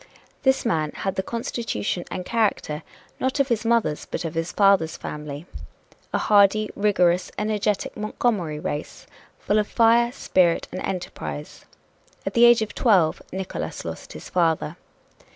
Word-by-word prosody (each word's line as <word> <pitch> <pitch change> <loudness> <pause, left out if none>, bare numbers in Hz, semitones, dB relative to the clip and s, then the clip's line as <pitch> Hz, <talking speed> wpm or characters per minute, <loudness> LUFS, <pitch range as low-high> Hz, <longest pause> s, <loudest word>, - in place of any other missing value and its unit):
This 265 -1 +2
man 155 -9 0
had 195 - -2
the 190 - -1
constitution 225 - -3
and 180 - -5
character, 205 -9 0 0.4
not 260 +2 -1
of 275 0 +2
his 230 -2 0
mother's, 230 -10 +1
but - - -4
of 165 - -3
his 165 +1 -2
father's 195 -6 +3
family 150 +1 -6 0.7
a - - +1
hardy, 210 +1 +4
rigorous, 180 -4 +2
energetic 210 -1 -1
Montgomery 210 -7 -1
race, 150 0 -5 0.3
full 210 +1 +1
of 210 - 0
fire, 235 +1 +4
spirit 180 -9 +2
and 185 - -5
enterprise. 175 -5 -5 0.6
At - - -2
the 235 0 +6
age 240 -1 +6
of 215 - -7
twelve 190 -10 +3
Nickolas 190 0 -5
lost - - -7
his - - -9
father. 165 -2 +1
195 Hz, 145 wpm, -24 LUFS, 165-225 Hz, 0.7 s, the